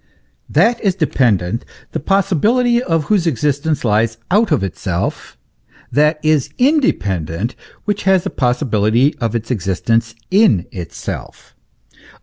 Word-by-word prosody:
That 225 +10 +2
is 195 -3 +2
dependent, 115 - +1 0.3
the - - -3
possibility 215 - +2
of 165 -8 0
whose 185 0 +1
existence 145 +1 0
lies 110 +1 +1
out 210 0 +3
of 140 -10 +2
itself; 90 -1 -4 0.5
that 150 +2 +3
is 155 -4 +2
independent 105 - 0 0.3
which 205 -1 -1
has 190 -2 +4
the - - -4
possibility 125 0 +1
of 115 -3 -2
its 115 +2 -3
existence 110 +2 0 0.2
in 185 - +4
itself. 85 -3 -7
140 Hz, 120 wpm, -17 LUFS, -, 0.5 s, has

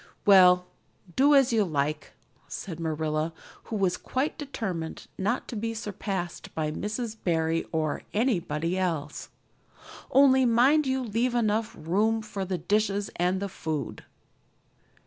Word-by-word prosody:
"Well, 180 -2 +7 0.5
do 285 +2 +5
as 265 -3 +4
you 220 -2 +4
like," 150 -3 -2 0.3
said 170 -5 -6
Marilla, 155 0 -1 0.3
who 225 - -5
was 190 -3 +1
quite 265 +4 -2
determined 195 - -5
not 205 +6 -1
to - - -5
be 225 +1 -3
surpassed 195 -5 -4
by 155 -1 -1
Mrs. 215 +6 -4
Barry 165 -1 +1
or 155 -2 -1
anybody 180 - 0
else. 160 -5 -2 0.8
"Only 265 -1 +6
mind 260 +5 +4
you 265 0 0
leave 240 +2 0
enough 220 -1 0
room 215 +7 +1
for 210 -2 -4
the 185 0 -2
dishes 205 +3 0
and 180 +2 +1
the 200 - -2
food." 160 -7 -4
195 Hz, 130 wpm, -27 LUFS, 165-230 Hz, 0.8 s, Well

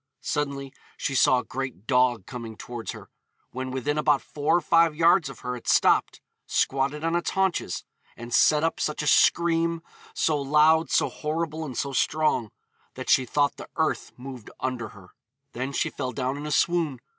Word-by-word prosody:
Suddenly 140 -2 -3 0.2
she 135 - -2
saw 130 0 +4
a 125 - -2
great 130 -7 -6
dog 125 -5 +2
coming 115 -4 -8
towards 120 -2 -6
her. - - -12 0.4
When 130 +1 -5
within 140 +3 -2
about 150 -2 +2
four 150 +3 +1
or - - +2
five 165 0 +3
yards 170 0 +4
of 135 - -11
her 125 0 -3
it 120 - -11
stopped, - - +3 0.3
squatted 140 +3 0
on 165 +1 0
its 175 - 0
haunches, 190 - -1 0.3
'and 120 0 -8
set 150 0 +4
up 165 - 0
such 150 0 -2
a - - -4
scream, 170 0 +3 0.3
so 150 -3 +1
loud, 155 +3 +4
so - - +2
horrible, 160 +1 -3
and 130 -6 -6
so 140 -1 -2
strong, 150 -6 +1 0.5
that - - -3
she 130 - +4
thought 145 +3 +1
the - - -10
earth - - -1
moved 125 -3 -9
under 125 -3 -3
her.' 100 -3 -15 0.4
Then 130 +3 -4
she - - -1
fell 130 -2 -4
down 130 0 -2
in 145 +1 -6
a - - -4
swoon. 160 -4 +1
140 Hz, 180 wpm, -26 LUFS, 130-155 Hz, 0.5 s, saw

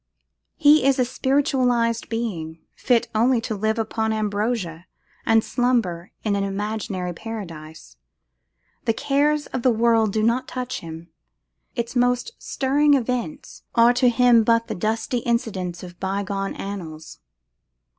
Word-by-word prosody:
He 295 -1 +5
is 275 0 +3
a 255 - +2
spiritualised 255 -3 +1
being, 185 -9 -3 0.2
fit 240 -1 +2
only 235 +3 +3
to 225 - -3
live 220 +2 -1
upon 220 0 -1
ambrosia, 205 -5 -2 0.4
and 225 0 +4
slumber 225 -9 0
in 210 -2 +1
an 200 - 0
imaginary 195 -2 -3
paradise. 160 - -8 0.9
The 225 - +2
cares 290 +3 +1
of 255 - -1
the 255 - +4
world 225 -2 +3
do 215 +1 0
not 245 +3 +1
touch 255 -1 -4
him; 165 +1 -9 0.7
its 235 0 -3
most 245 - +1
stirring 285 +2 +2
events 250 +3 -3
are 235 +1 +6
to 250 0 +4
him 240 -1 +5
but 230 +1 +3
the - - -3
dusty 225 +5 -1
incidents 195 -8 -2
of 175 -1 -11
bygone 195 0 -2
annals. 165 -6 -7
225 Hz, 135 wpm, -23 LUFS, 195-250 Hz, 0.9 s, are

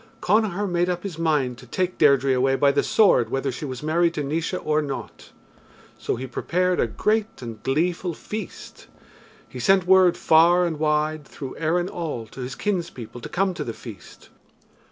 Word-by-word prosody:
Connachar 205 -1 +1
made 175 0 0
up 175 -1 -2
his 180 -5 -6
mind 145 -7 0
to 125 - -14
take 185 +7 -2
Deirdre 140 -2 +4
away 135 +1 +2
by 140 +1 +3
the - - +2
sword 175 - +3
whether 135 +1 -1
she 140 - -6
was 130 -1 -6
married 170 +2 +1
to 150 - -2
Naois 160 +5 -2
or 155 0 +2
not. 140 -2 -7 0.7
So - - -2
he 130 - -5
prepared 180 +8 -1
a - - +2
great 220 0 -1
and 115 -3 -8
gleeful 170 - -1
feast. 215 +2 -8 0.6
He 125 - -9
sent 190 +7 +3
word 185 -1 +5
far 170 +3 +5
and 160 -3 -3
wide 155 0 0
through 135 -1 -8
Erin 170 +3 0
all 155 -11 -5
to 120 +4 -10
his 130 +2 -5
kinspeople 165 - -4
to - - -7
come 190 +1 0
to - - -4
the 115 - -5
feast. 110 -7 -12
155 Hz, 180 wpm, -23 LUFS, 135-180 Hz, 0.7 s, word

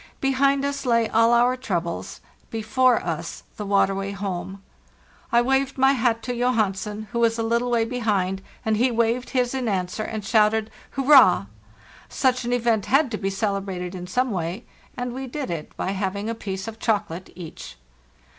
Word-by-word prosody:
Behind 275 +1 +2
us 280 -2 -3
lay 230 -2 +3
all 230 +1 +4
our 240 +1 +4
troubles, 175 -10 -4 0.3
before 240 +3 +2
us - - -4
the 210 -2 -5
waterway 195 0 +1
home. 195 0 -5 0.7
I 235 0 +4
waved 270 +1 +1
my 265 +1 +5
hat 230 -3 +1
to 250 - -3
Johansen, 215 -3 -1
who 235 - -2
was 230 0 +2
a 225 - -1
little 235 +2 0
way 235 -2 +2
behind, 205 -6 -1 0.2
and 220 -1 +2
he 250 +4 +3
waved 235 +1 0
his 250 -1 0
in 260 -2 -2
answer 185 0 -1
and 215 -1 -4
shouted 220 +1 +2 0.3
'Hurrah!' 265 - +6 0.6
Such 255 -2 +1
an 240 - -2
event 230 -4 +1
had 275 -1 +3
to 215 - -2
be 195 - -1
celebrated 195 -3 -2
in 180 -1 -7
some 250 +6 0
way, 180 +4 -3 0.3
and 245 -1 -3
we 265 +1 -5
did 270 -5 -4
it 160 -3 -6
by 190 - -1
having 200 +2 -2
a - - -2
piece 190 -3 -5
of 225 0 -7
chocolate 190 -5 -1
each. 170 - -9
225 Hz, 175 wpm, -24 LUFS, 195-250 Hz, 0.7 s, Hurrah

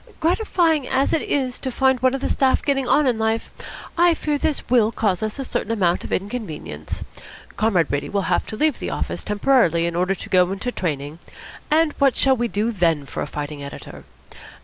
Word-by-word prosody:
Gratifying 330 - +1
as 270 - +1
it 315 - +2
is 260 -3 -1
to 265 - -3
find 265 0 +2
one 260 +1 +2
of 270 - -5
the - - 0
staff 265 -1 +2
getting 270 -3 0
on 295 +3 +4
in 245 -4 +1
life, 220 +1 -1 0.4
I 345 0 +4
fear 300 -2 -1
this 300 -1 -1
will 230 -3 +3
cause 210 -4 0
us 215 +2 -3
a 270 - -4
certain 225 - -2
amount 180 -6 +1
of - - -8
inconvenience. 185 - -4 0.5
Comrade 195 -7 +2
Brady 140 0 -2
will 200 -1 -1
have 175 +1 0
to - - -5
leave 310 +3 +1
the - - -4
office - - -3
temporarily 210 - +2
in 170 0 -2
order 180 +2 +1
to - - -8
go 180 -1 +4
into 200 +6 -3
training, 150 - -4 0.5
and 310 0 +3
what 275 -3 +3
shall 270 -1 +4
we 240 -1 -1
do 220 +1 -1
then 165 -8 +1
for - - -5
a - - -3
fighting 145 -1 -6
editor? 140 - -9
225 Hz, 205 wpm, -22 LUFS, 180-270 Hz, 0.5 s, on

